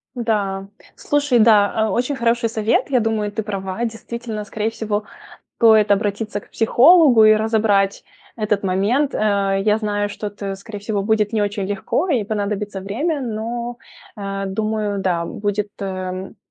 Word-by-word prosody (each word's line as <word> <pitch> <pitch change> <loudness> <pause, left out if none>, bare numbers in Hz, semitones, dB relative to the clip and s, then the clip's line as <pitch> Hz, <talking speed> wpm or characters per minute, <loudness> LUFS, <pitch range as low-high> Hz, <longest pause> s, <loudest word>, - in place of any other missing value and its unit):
Да, 200 -5 -1 0.3
слушай, 290 -4 +1
да, 215 -2 +5
а, 220 0 +1
очень 250 +7 0
хороший 235 -2 +1
совет. 220 +3 0
Я 255 -3 +3
думаю, 220 -2 -1
ты 220 +1 -3
права. 195 +1 -4
Действительно, 225 -1 -6
скорее 215 +1 -2
всего, 215 -2 -2 0.5
стоит 220 -3 +5
обратиться 205 +1 0
к - - -22
психологу 255 0 +6
и 215 - +8
разобрать 215 -3 +1 0.3
этот 210 -2 0
момент, 205 +10 +1
э. 200 -2 +1
Я 210 0 +3
знаю, 205 -1 -1
что 205 +1 -5
это 200 -1 -6
скорее 205 +2 -9
всего 205 0 -2
будет 215 0 +1
не 215 -2 +1
очень 205 -1 -2
легко 205 - -1
и 260 -9 +2
понадобится 205 -1 -3
время, 280 - -2
но, 235 0 -4 0.4
э, 195 -1 -4
думаю, 210 0 -2
да, 175 -3 0
будет, 205 +2 -3
эм, 185 -1 -5
210 Hz, 155 wpm, -20 LUFS, 200-225 Hz, 0.5 s, и